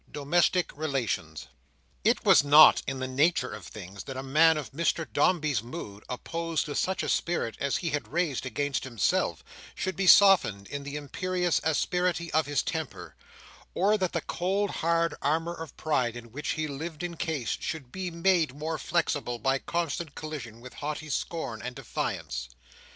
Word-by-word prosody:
Domestic 175 +5 +1
Relations 115 - -2 0.6
It - - +2
was - - +7
not 150 +2 +8
in 135 0 -2
the 130 0 -3
nature 135 +1 +1
of - - -9
things 100 -1 -9
that 135 -1 -6
a 130 - -4
man 155 +4 +5
of 150 - -5
Mr 165 +2 0
Dombey's 150 - +2
mood, 110 -5 -8
opposed 165 +5 -2
to 150 - -5
such 190 +6 0
a - - -2
spirit 170 -9 0
as 140 -1 0
he 170 -3 -2
had 145 0 -2
raised 165 -5 -1
against 140 +3 -2
himself, 120 -8 0 0.3
should 190 - -2
be 195 -1 0
softened 180 - +6
in 145 - -4
the 140 +1 -6
imperious 180 +4 -1
asperity 170 +2 0
of 160 0 +2
his 145 -2 +1
temper; 160 -4 -5 0.6
or 200 +4 +3
that 185 -4 -1
the - - 0
cold 195 +3 -1
hard 165 0 +1
armour 165 +4 0
of 165 -3 -9
pride 130 -7 0
in 120 -1 -11
which 150 +5 -3
he 155 0 -2
lived 155 +3 -6
encased, 160 -7 -3
should 145 -7 -5
be 185 +2 -4
made 170 -4 +2
more 155 +2 -3
flexible 145 -7 -1
by 135 +4 +1
constant 170 -2 -3
collision 125 -8 -7
with 125 0 -11
haughty 150 +1 -5
scorn 130 -7 -3
and 125 +1 -6
defiance. 65 - -4
150 Hz, 165 wpm, -28 LUFS, 130-170 Hz, 0.6 s, not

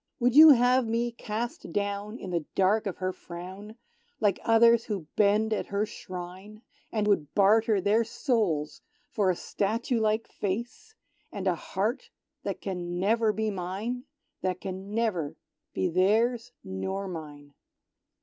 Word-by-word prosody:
Would 245 0 +2
you 315 +1 +11
have 250 -2 +5
me 235 +1 0
cast 230 -3 -5
down 205 +3 -2
in 190 - -7
the 170 -2 -1
dark 200 +3 +2
of 190 - -4
her 185 0 -2
frown, 185 +6 -9 0.4
Like 205 -4 +2
others 230 0 +5
who 200 -7 -4
bend 215 +2 +3
at - - -2
her 200 +1 0
shrine; 185 +3 -9 0.3
And 215 -2 0
would 175 -8 +1
barter 215 +1 +4
their 210 +5 +3
souls 205 - -1 0.3
for 205 -4 +1
a 180 - +2
statue 230 +8 -1
like 220 +1 +1
face, 235 - -5 0.4
And 195 - -5
a 185 - +3
heart 210 - -3 0.3
that 200 -8 -4
can 175 -2 -4
never 220 +3 +2
be 215 0 -1
mine? 200 +7 -4 0.4
That 185 -1 -1
can 190 +2 -6
never 195 -10 -1 0.4
be 95 - 0
theirs 225 +7 +2
nor 190 - -4
mine. 145 -4 -8
205 Hz, 145 wpm, -28 LUFS, 185-230 Hz, 0.4 s, you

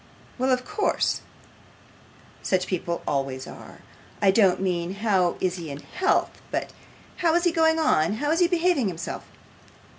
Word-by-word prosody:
Well, 260 +1 +1
of 255 0 +1
course; 420 0 0 1.2
such 185 -1 +1
people 170 -2 -3
always 135 -2 -2
are. - - -12 0.4
I 195 - +5
don't 195 -3 +4
mean 180 -1 -1
how 195 -4 +1
is 185 0 -1
he 165 -3 -6
in 140 0 -6
health, 380 +2 0
but - - -3 0.4
how 335 -2 +2
is 345 - +2
he 350 - +3
going 320 -1 +3
on: 205 - +2
how 290 +7 -1
is 330 - +2
he 350 - +5
behaving 345 - +2
himself? 170 -3 -5
200 Hz, 155 wpm, -25 LUFS, -, 1.2 s, I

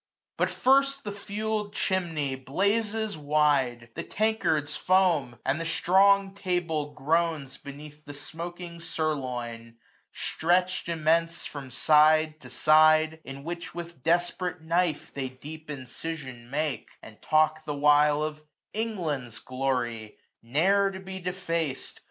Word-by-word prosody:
But - - +1
first 275 +1 +3
the 205 - -4
fueled 210 +1 -3
chinmey 165 -7 0
blazes 205 - -1
wide; 145 -5 +1
The - - -4
tankards 170 -9 0
foam; 170 -10 +2
and 140 +5 0
the - - -1
strong 195 +4 +4
table 175 -6 -1
groans 155 -2 0
Beneath 150 +1 -11
the 145 -1 -9
smoking 170 +3 -7
sirloin, 125 -8 -3 0.3
stretch'd 180 +1 0
immense 165 +1 +1
From 140 -3 -7
side 155 +3 +4
to 125 - -12
side; 155 +3 +5
in 135 +1 -8
which, 170 +2 -6
with 170 -4 -7
desperate 175 +3 0
knife, 165 -1 0
505 - - -32
They 135 -2 -3
deep 150 +4 -10
incision 130 -2 -6
make, 145 -4 -2
and 110 - -13
talk 155 0 +2
the 150 -1 -3
while 150 +1 +4
Of 155 0 -4 0.3
England's 160 - -3
glory, 125 -4 -2 0.2
ne'er 190 +12 +3
to 190 -1 -7
be 190 0 -7
defac'd. 170 -6 -3
155 Hz, 125 wpm, -27 LUFS, 140-180 Hz, 0.3 s, side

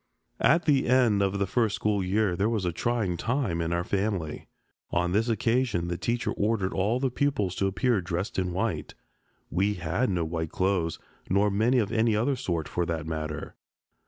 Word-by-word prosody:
At 170 +2 +4
the 140 -3 +3
end 120 -5 +4
of 100 0 +1
the 100 - +1
first 110 +1 +1
school 105 -2 0
year 95 0 +1
there 100 +4 +1
was 110 -5 -1
a 90 - +1
trying 105 -1 -1
time 115 -8 -1
in 85 0 -1
our 85 0 0
family. 95 -5 -2 0.4
On 90 0 0
this 110 +5 +1
occasion 115 -5 +1
the 85 - -1
teacher 120 +3 -1
ordered 100 -2 0
all 105 +6 +1
the 130 -1 0
pupils 120 -9 0
to 95 - +1
appear 110 +2 +1
dressed 85 +3 -3
in 90 -1 -1
white. 100 +5 -2 0.6
We 100 +4 +1
had 90 +9 -1
no 90 -4 0
white 80 0 -3
clothes, 90 -3 0 0.3
nor 100 +2 +3
many 110 +6 +2
of 110 -4 +1
any 115 -1 +2
other 120 +6 +1
sort, 85 -10 -2
for 90 - -1
that 80 -2 -2
matter. 75 -2 -4
100 Hz, 190 wpm, -27 LUFS, 85-115 Hz, 0.6 s, At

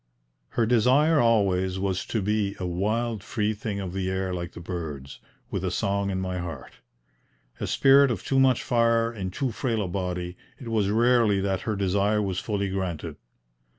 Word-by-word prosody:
Her 115 - +4
desire, 130 +7 +4
always, 95 -5 +2
was 95 -1 -2
to 110 -4 -1
be 105 -1 0
"a 90 - -3
wild 105 +5 -1
free 110 -1 -1
thing 105 -1 -4
of 95 -2 -5
the 95 -1 -2
air 95 0 -2
like 85 -1 -5
the - - -9
birds, 80 -6 -6 0.3
with - - -2
a - - 0
song 100 0 -1
in 95 -1 -2
my 95 -1 -3
heart." 80 -6 -7 0.9
A - - -3
spirit 140 0 +5
of 110 -7 -3
too 135 - +1
much 130 -2 +3
fire 115 -1 +2
in 95 -4 -4
too 125 +7 -2
frail 115 -2 -1
a - - -3
body, 90 -1 -3 0.2
it 120 - -7
was 105 -3 +1
rarely 115 -2 +3
that 95 -1 -1
her 110 - 0
desire 100 +2 +1
was 95 -3 -1
fully 100 -2 -2
granted. 95 -5 -3
100 Hz, 185 wpm, -26 LUFS, 95-115 Hz, 0.9 s, spirit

